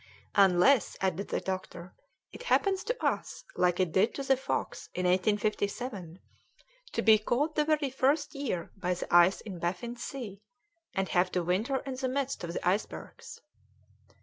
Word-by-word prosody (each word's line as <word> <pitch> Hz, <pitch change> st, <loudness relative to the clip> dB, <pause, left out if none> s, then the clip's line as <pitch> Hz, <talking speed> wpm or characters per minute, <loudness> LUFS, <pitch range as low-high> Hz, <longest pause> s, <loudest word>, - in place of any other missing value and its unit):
"Unless," 200 Hz, +6 st, +4 dB
added 190 Hz, +1 st, -1 dB
the -, -, -1 dB
doctor, 185 Hz, -1 st, -5 dB, 0.4 s
"it -, -, -10 dB
happens 395 Hz, -5 st, +2 dB
to -, -, -2 dB
us -, -, -2 dB
like 180 Hz, 0 st, +2 dB
it 185 Hz, -3 st, +1 dB
did 195 Hz, +7 st, +2 dB
to 275 Hz, -, -3 dB
the 270 Hz, 0 st, +3 dB
Fox 265 Hz, +1 st, -4 dB
in 180 Hz, -, -1 dB
1857, 205 Hz, 0 st, 0 dB, 0.8 s
to -, -, 0 dB
be 220 Hz, -1 st, +7 dB
caught 275 Hz, +8 st, 0 dB
the 300 Hz, -1 st, +1 dB
very 300 Hz, -3 st, +1 dB
first 280 Hz, +3 st, +1 dB
year 250 Hz, -12 st, -3 dB
by 180 Hz, -2 st, -1 dB
the 175 Hz, -, -2 dB
ice 175 Hz, +2 st, +6 dB
in 195 Hz, -5 st, -8 dB
Baffin's 190 Hz, +8 st, -3 dB
Sea, 215 Hz, -8 st, -7 dB, 0.5 s
and 195 Hz, -1 st, 0 dB
have 180 Hz, 0 st, +2 dB
to 180 Hz, -, +1 dB
winter 210 Hz, +10 st, 0 dB
in 270 Hz, -, -4 dB
the 260 Hz, -1 st, -1 dB
midst 275 Hz, -4 st, -2 dB
of 170 Hz, 0 st, -4 dB
the -, -, -3 dB
icebergs." 195 Hz, +4 st, -3 dB
205 Hz, 165 wpm, -30 LUFS, 180-270 Hz, 0.8 s, be